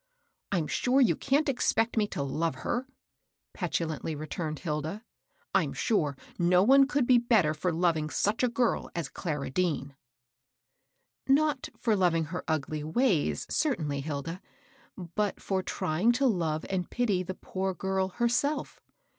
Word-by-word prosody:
" - - -50
I'm 175 -5 +1
sure 255 - +1
you 255 - +4
can't 290 +3 +1
expect 235 -3 +1
me 215 -2 +2
to 145 - -3
love 155 +2 -1
her,'* 250 +2 -1 0.7
petulantly 160 -1 -2
returned 155 +1 -4
Hilda. 160 +6 -3 0.2
" - - -41
I'm - - +2
sure 150 - 0 0.2
no 180 +1 +4
one 270 +4 +6
could 285 -3 +1
be 245 -1 +6
better 220 -10 +3
for 175 +4 -1
loving 165 -2 +1
such 205 +7 0
a 250 - +4
girl 240 0 0
as 170 -5 -3
Clara 150 -7 -4
Dean." 145 -4 -1 0.7
" - - -51 0.2
Not 285 0 +2
for 225 -3 +1
loving 175 -4 +2
her 180 - -3
ugly 155 -1 -1
ways, 160 - +1
certainly, 155 - 0
Hilda; 155 +5 -4 0.7
but 210 -2 0
for 190 -1 -1
trying 185 +6 +1
to 275 +3 +1
love 165 -9 0
and 185 -2 -2
pity 215 -7 +1
the 185 +1 -5
poor 190 0 -3
girl 190 +1 -1
herself. 240 +7 -1
185 Hz, 155 wpm, -29 LUFS, 155-240 Hz, 0.7 s, one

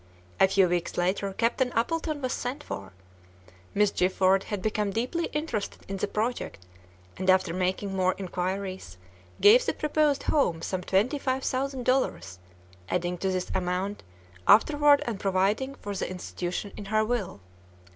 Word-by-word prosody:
A 195 - +7
few 195 -1 +4
weeks 175 -1 -2
later, 190 +3 0
Captain 240 +4 +1
Appleton 310 +4 -1
was 255 - 0
sent 265 +5 -4
for. 95 0 -7 0.8
Miss 210 0 +3
Gifford 190 +1 +2
had 205 - -3
become 210 +1 -1
deeply 250 - -1
interested 300 -9 -4
in 195 - -4
the - - -1
project, 215 - -3 0.5
and 185 0 -1
after 185 -2 +4
making 185 +2 -1
more 185 -1 +2
inquiries, 185 - -4 0.4
gave 460 +5 +8
the - - 0
proposed 300 -1 +1
home 175 - +1
some 185 -1 -2
twenty 210 +11 +1
five 265 -1 -1
thousand 265 -1 -2
dollars, 255 - 0 0.5
adding 180 0 -1
to 190 - 0
this 185 -1 -2
amount 185 +3 -2 0.5
afterward 290 +5 +6
and 225 -5 -3
providing 200 +8 0
for 205 -5 -6
the - - -2
institution 180 +1 -4
in 205 - -8
her 215 +2 +1
will. 220 - -2
200 Hz, 150 wpm, -27 LUFS, 185-255 Hz, 0.8 s, gave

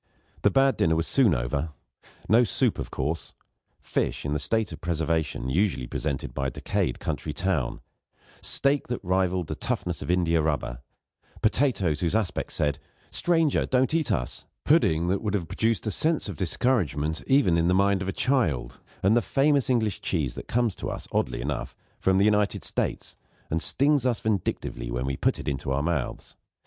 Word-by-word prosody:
The - - +4
bad 135 0 +3
dinner 80 0 +2
was 80 +1 +1
soon 120 - +4
over. 70 +5 -2 0.5
No 115 +3 +5
soup, 110 - +2
of - - -4
course; 75 +5 -3 0.5
fish, - - -2
in 75 - -1
the 75 - 0
state 105 +7 0
of 80 -1 -9
preservation 80 -5 -1
usually 85 -2 +1
presented 70 +2 -3
by 70 -1 -1
a - - 0
decayed - - -2
country 75 - -3
town; 85 -5 -1 0.6
steak 140 +1 +2
that 120 - -3
rivalled 90 -1 +1
the - - -4
toughness 85 -4 -3
of 70 - -6
india 85 -2 +2
rubber; 70 -6 -2 0.6
potatoes 110 - +2
whose 85 +3 0
aspect 110 -5 -1
said, 75 -2 0 0.3
"stranger, 165 -4 +2
don't 130 +2 +2
eat 160 -3 +1
us"; - - -2 0.2
pudding 80 +2 +3
that 95 +1 0
would 105 -2 -1
have 90 -5 -2
produced 110 +2 0
a 110 - 0
sense 160 - +1
of 100 - -5
discouragement, 85 - 0
even 135 -11 +4
in 85 0 +2
the 90 - +3
mind 100 0 +3
of 95 - -3
a - - 0
child; 90 - 0 0.2
and 100 +4 +4
the 120 - +4
famous 140 0 +2
English 110 -6 +1
cheese 75 -9 -1
which - - -8
comes 120 -3 +1
to - - -5
us, - - -6
oddly - - -1
enough, 70 0 -4 0.2
from 95 0 +2
the 100 - +4
United 105 -1 +2
States, - - -3 0.3
and 80 +1 0
stings 140 +2 +2
us 120 -3 0
vindictively 100 - -2
when - - -2
we 70 0 -1
put - - +1
it - - -8
into 70 -1 -2
our 70 +2 0
mouths. 80 -6 -3
90 Hz, 180 wpm, -26 LUFS, 75-115 Hz, 0.6 s, No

